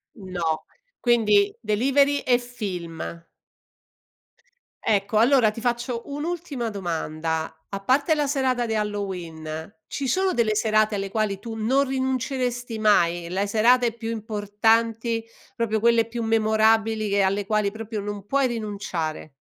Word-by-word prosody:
No, 175 Hz, -6 st, -3 dB, 0.3 s
quindi 210 Hz, -4 st, +3 dB
delivery 275 Hz, +6 st, +2 dB
e 245 Hz, -1 st, +3 dB
film. 175 Hz, -8 st, -6 dB, 1.6 s
Ecco 205 Hz, 0 st, +1 dB
allora 235 Hz, -1 st, +5 dB
ti 230 Hz, -, -8 dB
faccio 240 Hz, 0 st, -2 dB
un'ultima 295 Hz, -4 st, -3 dB
domanda, 160 Hz, -4 st, -3 dB
a 200 Hz, -, -5 dB
parte 280 Hz, -, +2 dB
la 295 Hz, -1 st, 0 dB
serata 260 Hz, -3 st, +1 dB
di 225 Hz, -, -1 dB
Halloween, 175 Hz, -7 st, -4 dB, 0.2 s
ci 275 Hz, -2 st, -3 dB
sono 375 Hz, +7 st, +2 dB
delle 220 Hz, -3 st, +1 dB
serate 215 Hz, 0 st, +2 dB
alle 195 Hz, -1 st, -3 dB
quali 215 Hz, -2 st, 0 dB
tu 225 Hz, +2 st, -7 dB
non 245 Hz, +6 st, +2 dB
rinunceresti 255 Hz, -3 st, -2 dB
mai? 175 Hz, -5 st, +3 dB
Le 195 Hz, +3 st, 0 dB
serate 235 Hz, +3 st, +4 dB
più 225 Hz, 0 st, -6 dB
importanti, 225 Hz, +1 st, 0 dB, 0.3 s
proprio 220 Hz, -3 st, 0 dB
quelle 235 Hz, -1 st, +4 dB
più 230 Hz, 0 st, -4 dB
memorabili 220 Hz, -1 st, +2 dB
che 200 Hz, 0 st, +2 dB
alle 195 Hz, +1 st, +1 dB
quali 210 Hz, -1 st, +1 dB
proprio 220 Hz, 0 st, -5 dB
non 205 Hz, -1 st, -5 dB
puoi 275 Hz, +4 st, +2 dB
rinunciare? 200 Hz, -9 st, -4 dB
220 Hz, 130 wpm, -24 LUFS, 200-245 Hz, 1.6 s, allora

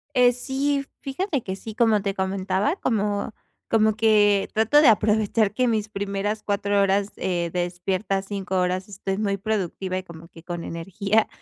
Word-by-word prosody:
Eh, 250 Hz, -1 st, +6 dB
sí, 275 Hz, +3 st, -1 dB
fíjate 280 Hz, -, -2 dB
que 190 Hz, -, -4 dB
sí, 220 Hz, +1 st, -8 dB
como 220 Hz, -4 st, +3 dB
te 200 Hz, -1 st, -2 dB
comentaba, 190 Hz, -, 0 dB
como 210 Hz, -, -1 dB, 0.4 s
como 215 Hz, -1 st, +3 dB
que 210 Hz, -2 st, +4 dB
trato 225 Hz, +7 st, +4 dB
de 300 Hz, -, +6 dB
aprovechar 215 Hz, -1 st, +3 dB
que 250 Hz, +3 st, +1 dB
mis 215 Hz, -2 st, -1 dB
primeras 200 Hz, +1 st, -3 dB
4 200 Hz, 0 st, 0 dB
horas, 195 Hz, +1 st, +1 dB
eh, 175 Hz, -2 st, -1 dB
despierta, 185 Hz, +3 st, -1 dB
5 195 Hz, -1 st, -4 dB
horas, 185 Hz, +1 st, -1 dB
estoy 195 Hz, 0 st, -4 dB
muy 200 Hz, -2 st, 0 dB
productiva 190 Hz, -2 st, -2 dB
y -, -, -5 dB
como 170 Hz, -1 st, -12 dB
que 165 Hz, -, -15 dB
con 175 Hz, -1 st, -5 dB
energía. 195 Hz, +5 st, 0 dB
205 Hz, 165 wpm, -24 LUFS, 190-220 Hz, 0.4 s, Eh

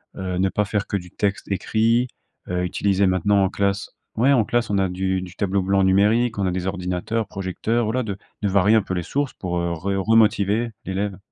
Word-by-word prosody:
Heu, 90 Hz, -1 st, -3 dB
ne 95 Hz, +1 st, +2 dB
pas 105 Hz, -, 0 dB
faire 100 Hz, 0 st, -2 dB
que -, -, -3 dB
du 90 Hz, -2 st, -9 dB
texte 100 Hz, 0 st, -2 dB
écrit. 115 Hz, +5 st, +1 dB, 0.4 s
Heu, 90 Hz, 0 st, -1 dB
utiliser 100 Hz, +2 st, +1 dB
maintenant, 95 Hz, +2 st, +2 dB
en 95 Hz, -, +2 dB
classe. 100 Hz, +1 st, -1 dB, 0.3 s
Ouais, 130 Hz, +5 st, +4 dB
en 120 Hz, -5 st, +4 dB
classe, 120 Hz, +2 st, 0 dB
on 100 Hz, -, +1 dB
a 95 Hz, -1 st, +1 dB
du 95 Hz, +1 st, -1 dB
du 90 Hz, 0 st, -9 dB
tableau 100 Hz, 0 st, 0 dB
blanc 95 Hz, +1 st, +2 dB
numérique, 105 Hz, +5 st, +3 dB
on 100 Hz, -, 0 dB
a -, -, 0 dB
des 90 Hz, 0 st, -3 dB
ordinateurs, 95 Hz, +4 st, -2 dB
projecteurs. 100 Hz, +5 st, -2 dB
Voilà, 125 Hz, +4 st, 0 dB
de 100 Hz, -4 st, -4 dB, 0.2 s
de 105 Hz, -, +1 dB
varier 100 Hz, +3 st, +4 dB
un 110 Hz, -, +5 dB
peu 95 Hz, -, -5 dB
les 90 Hz, -, -2 dB
sources 140 Hz, -, -2 dB
pour, 90 Hz, -2 st, -4 dB
heu, 85 Hz, 0 st, -1 dB
re 85 Hz, +2 st, -9 dB, 0.2 s
remotiver 110 Hz, 0 st, +3 dB
l'élève. 95 Hz, 0 st, -2 dB
100 Hz, 215 wpm, -22 LUFS, 95-110 Hz, 0.4 s, un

